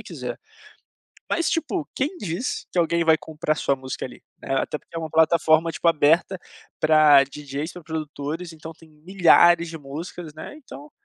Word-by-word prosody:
você -, -, -9 dB
quiser. -, -, -7 dB, 0.9 s
Mas 335 Hz, -, 0 dB
tipo, 330 Hz, 0 st, -2 dB
quem 295 Hz, +8 st, -2 dB
diz 185 Hz, -, -4 dB
que 180 Hz, -, -2 dB
alguém 170 Hz, 0 st, +2 dB
vai 160 Hz, -1 st, +5 dB
comprar 155 Hz, -1 st, -3 dB
sua 140 Hz, -, 0 dB
música 130 Hz, 0 st, -6 dB
ali, 125 Hz, -, -10 dB, 0.2 s
né, -, -, -4 dB
até 145 Hz, -, -1 dB
porque -, -, -26 dB
é -, -, -2 dB
uma 160 Hz, -1 st, -4 dB
plataforma 160 Hz, +1 st, +3 dB
tipo 170 Hz, -, 0 dB
aberta 165 Hz, +4 st, +3 dB, 0.4 s
pra 155 Hz, -3 st, +6 dB
dj's, 145 Hz, +3 st, -6 dB
pra 180 Hz, -, -11 dB
produtores 155 Hz, +2 st, -5 dB
então 160 Hz, 0 st, -10 dB
tem 165 Hz, 0 st, -19 dB
milhares 170 Hz, +1 st, +4 dB
de 165 Hz, -1 st, -7 dB
músicas, 155 Hz, +3 st, -8 dB
né, -, -, -9 dB
então, 150 Hz, -, -12 dB
160 Hz, 175 wpm, -23 LUFS, 150-170 Hz, 0.9 s, pra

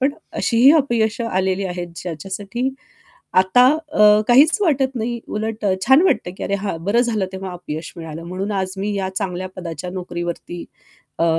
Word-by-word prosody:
पण 270 Hz, +2 st, +2 dB, 0.3 s
अशीही 245 Hz, +4 st, +5 dB
अपयश 235 Hz, -6 st, +1 dB
आलेली 190 Hz, -3 st, 0 dB
आहेत 175 Hz, -1 st, -4 dB
ज्याच्यासाठी 195 Hz, -, -4 dB, 0.7 s
आता 190 Hz, +7 st, +5 dB, 0.3 s
अ, 210 Hz, -2 st, +6 dB
काहीच 285 Hz, -, +6 dB
वाटत 270 Hz, -6 st, +1 dB
नाही. 235 Hz, 0 st, -2 dB
उलट 215 Hz, 0 st, -4 dB
अ, 195 Hz, -, +3 dB
छान 265 Hz, +6 st, +6 dB
वाटतं, 370 Hz, -, +1 dB
की -, -, -5 dB
अरे, 200 Hz, -, -1 dB
हां, 200 Hz, -3 st, -2 dB
बरं 215 Hz, +4 st, +3 dB
झालं 220 Hz, -6 st, 0 dB
तेव्हा 190 Hz, -1 st, -6 dB
अपयश 160 Hz, -2 st, -6 dB
मिळालं 165 Hz, -1 st, -7 dB
म्हणून 185 Hz, +4 st, -4 dB
आज 190 Hz, -2 st, -2 dB
मी 205 Hz, +1 st, -2 dB
या 190 Hz, -1 st, -1 dB
चांगल्या 185 Hz, -2 st, -3 dB
पदाच्या 170 Hz, -1 st, -6 dB
नोकरीवरती 175 Hz, -1 st, -5 dB, 0.5 s
अ, 165 Hz, -, +2 dB
195 Hz, 165 wpm, -20 LUFS, 180-235 Hz, 0.7 s, अ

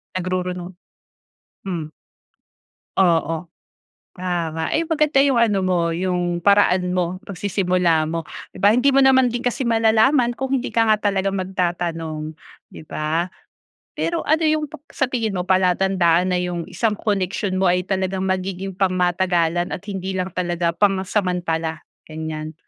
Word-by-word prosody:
Nagrurunong. 180 Hz, 0 st, -3 dB, 0.9 s
Hmm. 170 Hz, -5 st, -4 dB, 1.1 s
Oo. 165 Hz, -2 st, +1 dB, 0.7 s
Tama 170 Hz, -3 st, -2 dB
ay 325 Hz, +1 st, 0 dB
maganda 305 Hz, -4 st, +3 dB
'yong 275 Hz, -2 st, +3 dB
ano 220 Hz, -4 st, +3 dB
mo 175 Hz, -3 st, +1 dB
yong 175 Hz, 0 st, -1 dB
paraan 190 Hz, -1 st, +3 dB
mo. 180 Hz, +1 st, -1 dB
Pagsisimula 180 Hz, -4 st, 0 dB
mo, 165 Hz, 0 st, -3 dB, 0.2 s
'di -, -, -18 dB
ba? 205 Hz, +1 st, +6 dB
Hindi 250 Hz, +4 st, +3 dB
mo 275 Hz, 0 st, +5 dB
naman 260 Hz, -1 st, +5 dB
din 240 Hz, +1 st, -4 dB
kasi 245 Hz, +2 st, -1 dB
malalaman 230 Hz, +3 st, +3 dB
kung 265 Hz, +2 st, -1 dB
hindi 255 Hz, -, -4 dB
ka 225 Hz, -1 st, +2 dB
nga 215 Hz, -, +5 dB, 0.2 s
talaga 195 Hz, 0 st, 0 dB
magtatanong. 170 Hz, -5 st, -2 dB, 0.4 s
'Di -, -, -10 dB
ba? 160 Hz, +3 st, -1 dB, 0.7 s
Pero 335 Hz, 0 st, -1 dB
ano 315 Hz, +2 st, +1 dB
'yong 305 Hz, -1 st, +1 dB
pep 305 Hz, -1 st, -12 dB
sa 270 Hz, -, 0 dB
tingin 230 Hz, -5 st, -1 dB
mo 180 Hz, -1 st, -4 dB
palatandaan 185 Hz, -1 st, +3 dB
na 180 Hz, -, +1 dB
'yong 175 Hz, -2 st, -3 dB
isang 225 Hz, -3 st, 0 dB
koneksyon 195 Hz, -2 st, -1 dB
mo 190 Hz, -, +1 dB
ay 180 Hz, 0 st, +3 dB
talagang 190 Hz, -1 st, -1 dB
magiging 190 Hz, 0 st, -3 dB
pangmatagalan 180 Hz, -2 st, +1 dB
at -, -, -5 dB
hindi 190 Hz, -1 st, -4 dB
lang 185 Hz, 0 st, -2 dB
talaga 175 Hz, -1 st, -1 dB
pansamantala 180 Hz, -4 st, 0 dB, 0.2 s
ganyan? 155 Hz, 0 st, -6 dB
185 Hz, 140 wpm, -21 LUFS, 175-210 Hz, 1.1 s, ba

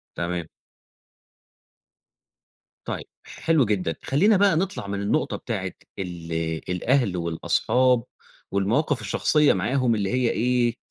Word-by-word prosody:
تمام. 85 Hz, -1 st, -3 dB, 2.4 s
طيب، -, -, -4 dB, 0.2 s
حلو 160 Hz, -5 st, +1 dB
جدًا، 95 Hz, -6 st, -1 dB
خلّينا 195 Hz, +10 st, +3 dB
بقى 200 Hz, -4 st, +4 dB
نطلَع 160 Hz, -, -2 dB
من 100 Hz, 0 st, -3 dB
النقطة 100 Hz, -, 0 dB
بتاعة -, -, -4 dB, 0.3 s
ال 85 Hz, -3 st, -6 dB, 0.4 s
الأهل 115 Hz, 0 st, +1 dB
والأصحاب 115 Hz, +9 st, +1 dB, 0.5 s
والمواقف 115 Hz, +8 st, +1 dB
الشخصيّة 150 Hz, +8 st, +3 dB
معاهم 120 Hz, +5 st, +1 dB
اللي 100 Hz, -2 st, -1 dB
هي 125 Hz, -2 st, +2 dB
إيه، 120 Hz, 0 st, +1 dB
115 Hz, 105 wpm, -24 LUFS, 95-135 Hz, 2.4 s, بقى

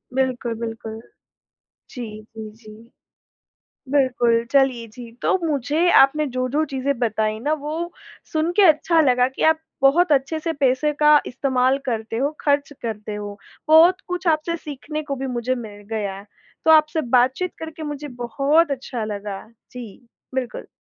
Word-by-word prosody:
बिल्कुल, 255 Hz, -3 st, -1 dB
बिल्कुल। 225 Hz, -1 st, -6 dB, 0.9 s
जी, 215 Hz, -4 st, -8 dB
जी, 215 Hz, -1 st, -7 dB
जी। 220 Hz, +2 st, -15 dB, 1.0 s
बिल्कुल, 240 Hz, -4 st, +2 dB
चलिए 265 Hz, -4 st, +2 dB
जी, 235 Hz, +1 st, -11 dB
तो -, -, +3 dB
मुझे 300 Hz, +4 st, +1 dB
आपने 295 Hz, +3 st, +4 dB
जो-जो 255 Hz, +5 st, 0 dB
चीज़ें 265 Hz, -1 st, -1 dB
बताई 215 Hz, -2 st, 0 dB
ना, 295 Hz, +5 st, -1 dB
वो 310 Hz, +3 st, -3 dB, 0.4 s
सुन 315 Hz, +2 st, +1 dB
के 410 Hz, -, +6 dB
अच्छा 330 Hz, 0 st, +4 dB
लगा 250 Hz, -3 st, +3 dB
कि 265 Hz, -, -6 dB
आप 320 Hz, -, 0 dB, 0.2 s
बहुत 310 Hz, +4 st, +4 dB
अच्छे 275 Hz, +3 st, +1 dB
से 330 Hz, 0 st, -2 dB
पैसे 280 Hz, +1 st, +1 dB
का 300 Hz, 0 st, +7 dB
इस्तेमाल 260 Hz, 0 st, +1 dB
करते 225 Hz, -2 st, -3 dB
हो, 280 Hz, +4 st, 0 dB
खर्च 285 Hz, 0 st, +1 dB
करते 215 Hz, -2 st, -5 dB
हो। 205 Hz, -1 st, -6 dB, 0.3 s
बहुत 340 Hz, +5 st, +6 dB
कुछ 360 Hz, 0 st, -4 dB
आपसे 335 Hz, +2 st, -4 dB
सीखने 305 Hz, 0 st, -6 dB
को 285 Hz, -2 st, -4 dB
भी 270 Hz, +1 st, -4 dB
मुझे 250 Hz, 0 st, -1 dB
मिल 210 Hz, -4 st, -9 dB
गया। 200 Hz, -3 st, -3 dB, 0.4 s
तो 320 Hz, -, +5 dB
आपसे 310 Hz, +1 st, +5 dB, 0.2 s
बातचीत 260 Hz, +9 st, +1 dB
करके 320 Hz, 0 st, -8 dB
मुझे 295 Hz, -1 st, -5 dB
बहुत 280 Hz, +7 st, +2 dB
अच्छा 255 Hz, -4 st, -4 dB
लगा। 205 Hz, -1 st, -6 dB, 0.2 s
जी, 240 Hz, -2 st, -10 dB, 0.3 s
बिल्कुल। 250 Hz, -2 st, -4 dB
265 Hz, 150 wpm, -22 LUFS, 230-305 Hz, 1.0 s, का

